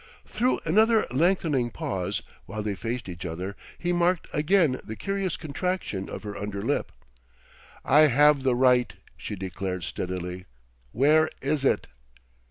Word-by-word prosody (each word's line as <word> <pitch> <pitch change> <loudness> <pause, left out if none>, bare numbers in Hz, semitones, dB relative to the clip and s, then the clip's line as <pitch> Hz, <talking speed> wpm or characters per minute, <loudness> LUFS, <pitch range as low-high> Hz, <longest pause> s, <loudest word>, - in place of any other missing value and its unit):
Through 245 +4 0
another 220 +6 +4
lengthening 150 -4 +2
pause, 95 -5 -3 0.2
while 105 +2 -4
they 105 -1 -1
faced 115 +2 -4
each 85 -2 -7
other, 90 +3 -5 0.2
he 175 0 -1
marked 175 0 +2
again 155 -3 +2
the 110 - -7
curious 195 - -2
contraction 155 - -3
of - - -7
her 105 -1 -6
under 100 -1 -4
lip. - - -1 0.9
"I 150 +3 +6
have 145 +1 +5
the 130 -2 +2
right," 125 -1 +3 0.2
she - - -6
declared 95 -1 -4
steadily. 90 0 -4 0.5
"Where 155 +5 +4
is 140 0 0
it?" - - +2
130 Hz, 140 wpm, -26 LUFS, 100-165 Hz, 0.9 s, I